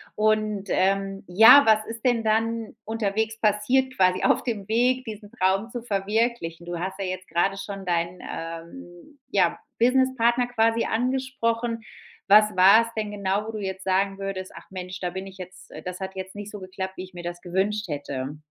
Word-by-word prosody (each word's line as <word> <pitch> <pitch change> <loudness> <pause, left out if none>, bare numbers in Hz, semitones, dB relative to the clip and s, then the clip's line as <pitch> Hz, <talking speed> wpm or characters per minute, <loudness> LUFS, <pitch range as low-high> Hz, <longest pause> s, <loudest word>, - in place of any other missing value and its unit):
Und, 215 -2 +1
ähm, 195 +1 0
ja, 225 +10 +9
was 215 -1 +4
ist 225 +2 -8
denn 240 -2 +2
dann 225 +1 0
unterwegs 220 0 -1
passiert 245 +5 +2
quasi 185 -1 +3
auf - - +3
dem 215 -4 -4
Weg, 250 +3 +2
diesen 210 -3 -9
Traum 195 +5 +1
zu 240 -1 -6
verwirklichen? 200 -4 -1
Du 175 -1 -5
hast 190 +2 -4
ja 195 - -3
jetzt 185 0 -5
gerade 195 +4 0
schon 195 -1 -7
deinen, 175 +1 -1
ähm, 175 - -9
ja, - - +2 0.2
Businesspartner 250 -1 +3
quasi 230 -1 +1
angesprochen. 240 -2 -1 0.5
Was 210 -1 +6
war 195 +5 +7
es 230 0 -9
denn 215 -1 -2
genau, 200 +1 -1
wo - - -4
du 215 - -6
jetzt 190 -1 -5
sagen 195 +1 +1
würdest: 195 -1 -5
„Ach - - -13
Mensch, 185 0 -7
da 180 - -1
bin 190 +2 -6
ich 190 0 -12
jetzt 180 0 -11
das 180 +1 -6
hat 190 0 -6
jetzt 190 +1 -7
nicht 205 0 -7
so 205 - -8
geklappt, 190 0 -6
wie 185 - -6
ich 185 0 -13
mir 175 -1 -8
das 175 0 -6
gewünscht 195 +2 -1
hätte.“? 145 -1 -4
200 Hz, 185 wpm, -25 LUFS, 185-225 Hz, 0.5 s, ja